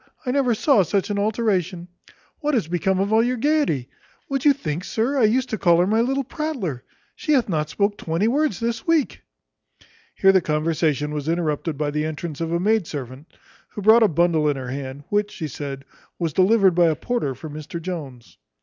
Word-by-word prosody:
I 250 - 0
never 255 -3 +2
saw 265 -1 +4
such 195 +3 -1
an 205 - -1
alteration. 200 -5 -1 0.5
What 300 -2 0
is 215 -10 0
become 185 +2 0
of 200 +2 0
all 220 - +5
your 250 +1 0
gaiety? 280 - +1 0.4
Would 275 -1 -2
you 290 - +8
think, 175 - -3
sir, 230 +8 -1
I 230 - +5
used 255 +4 +1
to 220 - -3
call 170 -2 +4
her 175 - +3
my 220 +4 +2
little 270 +3 0
prattler? 250 - -4 0.3
She 305 - -1
hath 260 -5 +3
not 155 -5 -1
spoke 205 +4 -1
twenty 165 +6 0
words 285 - +1
this 230 +3 -3
week." 330 -4 +1 0.9
Here 195 - +5
their 190 -1 +4
conversation 150 -2 0
was 150 +1 -3
interrupted 165 -2 -1
by 150 0 -1
the 150 +1 -1
entrance 155 0 -5
of 165 0 -2
a 170 - +1
maid 210 -1 +1
servant, 135 +1 -7 0.4
who 205 - -7
brought 220 +3 +7
a 220 - +6
bundle 165 -3 +2
in 145 - 0
her 130 -2 -6
hand, 135 +1 -6
which, 205 0 +1
she 160 -6 -5
said, 140 0 -7 0.3
"was 165 -4 -2
delivered 190 +2 +4
by 175 0 +4
a 160 - +2
porter 150 - -2
for 160 - -9
Mr 155 +2 -7
Jones." 145 - -7
180 Hz, 205 wpm, -22 LUFS, 150-225 Hz, 0.9 s, you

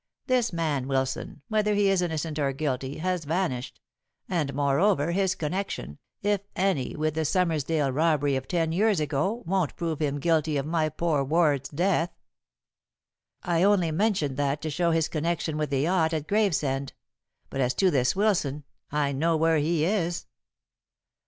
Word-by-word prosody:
This 250 -3 +1
man 155 -6 -1
Wilson, 135 +1 -2
whether 210 -1 +1
he 205 -1 +3
is 195 -2 +3
innocent 160 -2 -2
or 140 -2 +1
guilty, 135 -1 -3
has 180 0 -1
vanished; 155 -5 -2 0.5
and, 160 -6 -1
moreover, 145 +3 +2
his 190 +1 +1
connection, 165 - -4 0.2
if 205 -1 +1
any, 185 -9 0
with 155 0 -1
the 160 - -1
Summersdale 155 -4 +1
robbery 145 -2 +2
of 130 0 -3
ten 165 -3 0
years 205 +2 +2
ago 155 - -1
won't 180 -3 0
prove 165 -3 -3
him 145 -1 0
guilty 155 -1 +1
of 135 - -1
my 155 -1 0
poor 155 -2 0
ward's 145 -2 +2
death." 175 +2 +1 1.3
"I 170 -2 +1
only 190 -4 +3
mentioned 160 -7 0
that 145 0 0
to 155 - -2
show 170 +4 +1
his 165 -1 +2
connection 165 0 -2
with 150 -1 -1
the 135 -1 0
yacht 165 0 +2
at 155 -1 -3
Gravesend. 150 -10 0 0.6
But 135 - -2
as 125 0 +1
to 190 -2 +3
this 125 -1 +2
Wilson, 185 -9 +1 0.3
I 145 -1 +1
know 160 +4 +1
where 160 0 +3
he 155 +1 +1
is." 175 -3 -1
160 Hz, 160 wpm, -27 LUFS, 145-180 Hz, 1.3 s, he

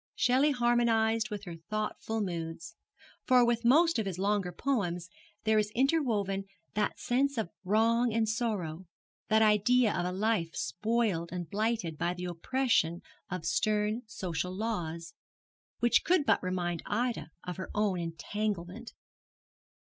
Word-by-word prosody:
Shelley 260 +4 +3
harmonized 230 -4 +2
with 205 -2 -5
her 175 -4 -7
thoughtful 215 +1 -2
moods, 165 -3 -5 0.5
for 250 -2 +5
with 235 0 +1
most 315 +4 +5
of 215 - -1
his 185 -3 -3
longer 200 -1 0
poems 175 -10 -2 0.3
there 220 0 +3
is 210 -1 0
interwoven 230 -9 +1 0.3
that 210 0 0
sense 275 +2 +1
of 215 -6 -2
wrong 230 +4 +3
and 225 0 +1
sorrow, 190 -7 -2 0.4
that 220 0 +4
idea 215 +2 +4
of 175 - 0
a - - -2
life 190 -4 0
spoiled 210 -4 -1
and 175 -2 -4
blighted 215 -6 -1
by 175 +1 0
the 180 0 -5
oppression 175 -1 0 0.3
of 180 -3 -4
stern 210 +5 +1
social 180 -3 -3
laws, 170 - -3 0.7
which 240 0 +4
could 350 -4 +3
but - - +3
remind 175 -2 -2
Ida 235 -3 -1
of 180 0 -5
her 185 - -6
own 205 -4 +1
entanglement. 195 +5 -4
210 Hz, 140 wpm, -30 LUFS, 180-235 Hz, 0.7 s, for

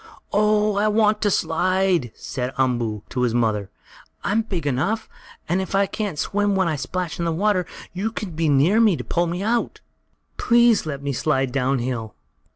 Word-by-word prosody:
"Oh, 210 0 +2
I 210 +1 +2
want 215 0 +2
to 210 - +2
slide!" 180 - +1
said 125 0 -4
Umboo 120 -5 0
to 125 - -2
his 120 -2 +1
mother. 110 -4 0 0.5
"I'm 215 +2 +1
big 185 -8 -4
enough, 150 - -1 0.4
and 180 +3 +1
if 190 - -4
I 200 0 +4
can't 200 -5 -4
swim 205 +4 0
when 190 -2 +2
I 160 - 0
splash 170 +6 -4
in 170 - -1
the 165 - +1
water, 185 +1 +1 0.3
you 200 +5 -2
can 210 -4 -5
be 160 -1 0
near 150 +10 +4
to 195 - +3
pull 175 +5 0
me 175 +3 -3
out. 230 +2 -1 0.6
Please 235 -6 +4
let 140 -2 -5
me 140 -1 -2
slide 135 -1 0
down 135 +1 +1
hill!" 120 -3 -4
175 Hz, 180 wpm, -22 LUFS, 135-205 Hz, 0.6 s, I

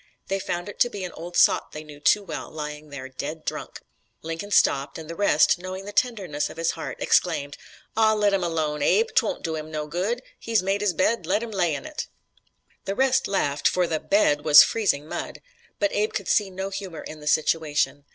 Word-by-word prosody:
They 195 0 0
found 175 -1 -3
it 205 - -9
to 240 - +4
be 200 -5 -6
an 180 - -4
old 175 +2 -7
sot - - +4
they 150 - -7
knew 150 -1 -12
too 205 +7 +3
well 165 -5 -6
lying 150 -1 -7
there, 135 -2 -7
dead 150 +4 -6
drunk. - - -5 0.4
Lincoln 165 +5 -5
stopped, 140 -7 +2
and 160 -1 -8
the 165 - -6
rest, 200 -1 +3
knowing 185 +1 -6
the 205 - -6
tenderness 200 -11 0
of - - -11
his 165 0 +1
heart, - - -6
exclaimed: 145 -5 +1 0.4
"Aw, 220 0 +4
let 205 -1 +2
him 190 -2 +1
alone, 155 -3 -1
Abe. 450 - +3
'Twon't - - +1
do 160 -1 -2
him 155 0 -6
no 155 -1 -3
good. 190 +11 -2 0.2
He's 225 -4 +1
made 195 +2 0
his 205 -3 +1
bed, 185 -1 +1
let 205 +5 +1
him 235 - -6
lay 175 -6 +1
in - - -7
it!" 310 -1 -5 0.8
The 195 - -2
rest 260 +1 +2
laughed 145 -7 +1
for 180 -1 +2
the 160 -2 -1
"bed" 150 -8 +2
was 150 -1 +9
freezing 195 -10 0
mud. - - -5 0.4
But 200 -1 0
Abe 210 +1 0
could - - -3
see 205 -2 +2
no 190 +1 -5
humor 195 -5 -6
in 155 - -9
the 150 - -10
situation. 150 -2 +1
175 Hz, 215 wpm, -25 LUFS, 150-205 Hz, 0.8 s, was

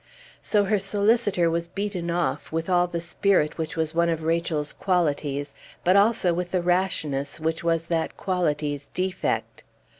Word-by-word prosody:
So 205 -1 +2
her 205 +1 +1
solicitor 200 -2 +2
was 170 +1 -1
beaten 190 -2 -3
off, 170 0 -1
with 165 +3 -2
all 175 0 +4
the 170 -1 -3
spirit 170 -2 +1
which 160 - -3
was 160 -1 -1
one 170 0 +2
of 165 -1 -1
Rachel's 160 -2 0
qualities, 145 -6 0 0.3
but 185 +2 +4
also 200 -3 +4
with 180 +1 -2
the 180 -2 +1
rashness 170 -6 0
which 160 +1 -2
was 165 -1 +1
that 165 -1 -2
quality's 150 -6 -1
defect. 185 0 -2
170 Hz, 155 wpm, -25 LUFS, 160-185 Hz, 0.3 s, all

